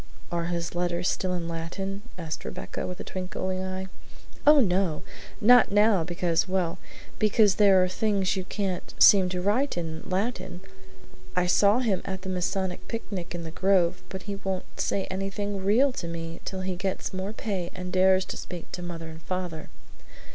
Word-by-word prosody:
"Are 170 -1 -1
his 170 -1 -2
letters 175 0 0
still 185 - 0
in 175 -2 -2
Latin?" 190 +4 -4 0.2
asked 160 -3 -5
Rebecca, - - -5
with 180 -1 -6
a - - -4
twinkling 185 0 -3
eye. 190 0 -3 0.6
"Oh, 300 0 +9
no! 185 - +2 0.4
Not 245 +1 +6
now, 205 -3 +4
because 170 +1 0
well, 180 -3 0 0.4
because 210 -1 +4
there 195 -2 +7
are - - +2
things 200 0 +1
you 190 - -2
can't 190 -2 -3
seem 190 -3 +7
to 180 0 -3
write 225 +5 +1
in 160 -2 -4
Latin. 190 -1 -2 0.7
I 180 - +2
saw 200 +4 +4
him 210 -7 +1
at 190 -1 -5
the 190 - -4
Masonic 185 0 -2
picnic 195 -6 -5
in 170 - -4
the 160 - -6
grove, 185 0 +2
but 190 -1 -6
he 200 -1 -4
won't 190 -1 -5
say 195 - 0
anything 195 +1 -3
REAL 240 +8 +4
to 185 -8 -5
me 165 0 -6
till 190 -1 -4
he 185 -1 -2
gets 190 +1 -3
more 190 +2 -3
pay 195 -5 -3
and 180 0 -6
dares 185 0 +4
to - - -6
speak 175 -2 -8
to 180 - -5
mother 170 -2 -6
and 160 0 -10
father. 180 -3 -4
185 Hz, 175 wpm, -27 LUFS, 175-195 Hz, 0.7 s, Oh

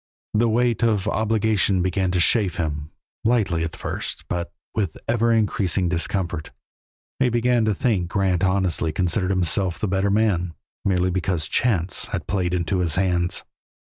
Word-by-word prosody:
The 115 +2 +3
weight 120 0 +1
of 110 -4 +1
obligation 110 -4 +1
began 95 0 0
to 90 0 0
chafe 95 +2 +2
him, 75 -2 -3 0.3
lightly 105 -8 +1
at 80 - -4
first, - - -4
but 85 -1 -3 0.2
with 95 -7 -2
ever 115 0 +2
increasing 100 -5 +1
discomfort. 85 -2 -2 0.7
He 130 -2 +3
began 120 -1 +2
to 110 -2 +1
think 105 -5 +1
that 85 - -12
Grant 95 -3 +1
honestly 95 -4 +1
considered 90 +3 0
himself 90 -1 +1
the 105 - -2
better 95 +1 +1
man, 95 -5 +1 0.3
merely 90 -1 +1
because 90 -3 -1
chance 95 -8 +1
had - - -4
played 90 -3 -1
into 90 +2 -1
his 85 -4 +1
hands. 90 -2 0
95 Hz, 155 wpm, -23 LUFS, 90-110 Hz, 0.7 s, The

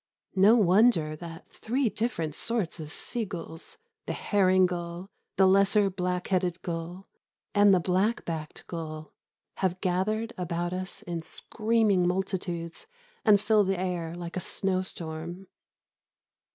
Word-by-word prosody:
No 200 +4 +7
wonder 190 -6 +4
that 165 0 -9
three 255 +3 -1
different 205 -9 -2
sorts 210 -3 -2
of 155 -1 -6
sea 240 +6 -2
gulls 165 -4 -7 0.3
the - - -1
herring 185 -2 +3
gull, 175 +1 -4 0.3
the 190 - +6
lesser 195 +1 +4
black 180 -1 -2
headed 180 -2 +1
gull, 175 +2 -5 0.5
and 205 -1 +6
the 185 - +5
black 190 +6 +1
backed 160 -2 -5
gull 155 -2 -6 0.4
have 185 -1 0
gathered 215 +5 0
about 175 0 -2
us 185 0 -5
in 170 -1 -4
screaming 215 0 +1
multitudes 180 - -3 0.4
and 210 -5 +6
fill 210 +1 +4
the 190 -1 0
air 175 -3 -2
like 175 -1 -6
a - - 0
snowstorm. 180 -2 -3
185 Hz, 130 wpm, -28 LUFS, 170-200 Hz, 0.5 s, No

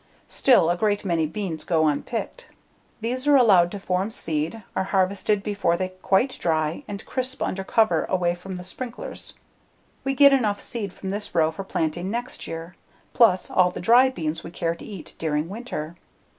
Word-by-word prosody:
Still, 235 -11 +4
a - - +1
great 205 +2 0
many 165 -4 +1
beans 165 -3 -4
go 160 -2 +2
unpicked. 235 - -3 0.5
These 255 +5 -2
are 290 - +6
allowed 195 -9 +6
to 205 - -6
form 190 +1 -1
seed, 165 +1 -3
are 190 - 0
harvested 195 +2 +1
before 200 -5 0
they 185 0 -2
quite 190 +7 0
dry, 155 - 0
and 205 0 -6
crisp 260 0 -3
under 190 +1 -2
cover 220 +3 +2
away 175 -2 +1
from 185 +2 -8
the 180 - -7
sprinklers. 240 +6 -7 0.7
We 270 0 -1
get 280 0 +7
enough 215 -6 +1
seed 210 -5 -4
from 190 0 -6
this 205 -2 -4
row 160 -1 +3
for 195 +5 -6
planting 175 0 -2
next 240 +4 -4
year, 165 +2 -7 0.4
plus 195 -6 +4
all 180 -1 +4
the 180 - -7
dry 245 +3 +6
beans 160 -8 -4
we - - -7
care 165 -1 -2
to 170 - -12
eat 195 -6 -9
during 155 0 -1
winter. 190 -7 -6
190 Hz, 180 wpm, -24 LUFS, 170-225 Hz, 0.7 s, get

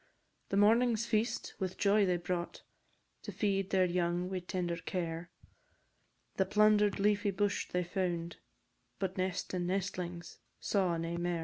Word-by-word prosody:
The 195 - 0
morning's 225 +2 +4
feast 230 +1 -1
with 185 -2 -3
joy 205 0 +4
they 180 -1 +2
brought, 175 0 -4 0.6
To - - -6
feed 195 -2 0
their 185 -1 +3
young 175 0 0
wi' 185 - -1
tender 175 -1 -3
care; 170 0 -4 1.1
The 190 - +3
plunder'd 210 0 +4
leafy 205 0 +2
bush 200 +1 -1
they 180 0 0
found, 170 -2 -2 0.6
But 190 -1 -2
nest 185 -1 -2
and 175 -1 -1
nestlings 180 -2 -3 0.2
saw 185 -4 +1
nae 165 +1 -3
mair. 175 0 -1
185 Hz, 140 wpm, -33 LUFS, 175-205 Hz, 1.1 s, morning's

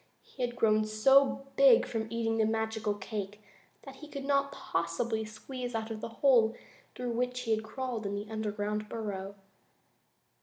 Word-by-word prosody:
He 260 - -11
had 240 -1 -1
grown 215 -2 +3
so 270 +6 +4
big 270 -3 +7
from 220 -1 -3
eating 225 -1 0
the 220 - +4
magical 220 -1 -1
cake 205 0 -5 0.4
that 270 -1 -10
he 305 - -10
could 280 -2 -6
not 280 0 +2
possibly 220 +5 -2
squeeze 245 +3 -6
out 220 0 -3
of 215 -1 -5
the - - -4 0.2
hole 230 -4 +5 0.4
through 250 -1 -3
which 250 +1 -1
he 230 -2 -2
had 220 0 +1
crawled 235 -2 -4
into 200 +1 -3
the 215 - -13
underground 210 -1 -2
burrow. 200 -3 -4
225 Hz, 165 wpm, -31 LUFS, 215-250 Hz, 0.4 s, big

